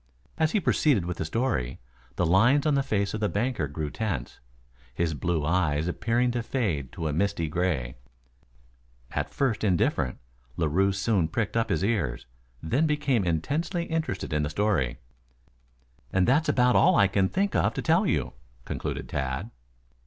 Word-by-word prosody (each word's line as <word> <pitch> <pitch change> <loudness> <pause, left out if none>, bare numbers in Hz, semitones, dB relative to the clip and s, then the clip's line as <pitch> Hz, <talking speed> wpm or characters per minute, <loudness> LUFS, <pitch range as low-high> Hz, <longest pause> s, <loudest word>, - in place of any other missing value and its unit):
As 160 -1 +2
he 215 - +3
proceeded 140 - +2
with 90 0 -4
the - - -2
story, 80 - -1 0.4
the 90 - +1
lines 120 - +4
on 150 - +3
the 140 - +3
face 100 -7 -1
of 110 - -2
the 105 -1 0
banker 110 - -1
grew 75 +1 -4
tense, 95 - -4 0.6
his 85 -2 0
blue 80 +2 -1
eyes 80 -2 +1
appearing 120 +7 +1
to 120 0 -1
fade 95 - -2
to 80 - -3
a 75 - -1
misty 95 0 0
gray. 75 -7 -1 1.1
At - - -2
first 130 -7 -1
indifferent, 85 -9 +1 0.4
Larue 85 +5 +2
soon 95 -3 +1
pricked 110 +3 -2
up 115 -1 +1
his 80 +2 0
ears, 105 - -1 0.4
then 130 - +1
became 145 -7 +1
intensely 150 - -1
interested 160 - -3
in 75 - +1
the 75 - -1
story. 85 - 0 1.1
"And 95 -1 +2
that's 150 +6 +3
about 125 -1 +3
all 180 +1 +5
I 100 -5 +5
can 95 -1 +1
think 200 +2 0
of - - +2
to - - -3
tell 175 +5 +3
you," - - 0 0.3
concluded - - -4
Tad. 65 -1 -3
100 Hz, 165 wpm, -27 LUFS, 80-125 Hz, 1.1 s, all